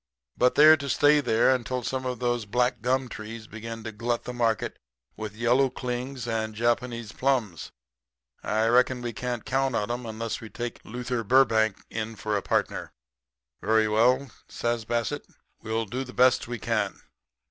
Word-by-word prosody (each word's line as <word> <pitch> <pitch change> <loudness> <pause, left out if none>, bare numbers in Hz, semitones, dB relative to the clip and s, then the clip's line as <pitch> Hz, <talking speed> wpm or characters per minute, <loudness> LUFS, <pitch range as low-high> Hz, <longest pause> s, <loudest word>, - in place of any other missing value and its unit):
But 125 0 +3
they're 155 +2 +8
to 140 -1 -5
stay 145 +3 +5
there 120 0 +3
until 125 0 -2
some 130 +2 -2
of 125 -1 -2
those 120 -2 -1
black 125 +4 +1
gum 130 +1 +1
trees 110 0 -8
begin 115 +1 -7
to 110 - -5
glut 115 +2 -2
the 125 - -6
market 115 -3 0 0.4
with 110 -1 -6
yellow 125 +4 +3
clings 125 0 -4
and 110 -1 -2
Japanese 120 0 -1
plums. 125 - -1 0.7
I 110 +1 +1
reckon 125 +1 +3
we 120 -1 -3
can't 120 0 -4
count 135 -1 0
on 105 - -1
them 120 0 -3
unless 110 +1 -4
we 110 - -9
take 120 0 -6
Luther 125 +1 -3
Burbank 110 -3 +3
in 110 0 -4
for 105 +1 -2
a 100 - 0
partner.' - - -1 0.7
"'Very 110 +1 +3
well,' 125 +5 +3 0.2
says 120 -1 -2
Bassett, 115 0 -1 0.4
'we'll 110 +1 -2
do 125 +6 -3
the 125 -1 -10
best 125 -1 +4
we 120 0 -4
can. - - -1
120 Hz, 170 wpm, -27 LUFS, 110-125 Hz, 0.7 s, they're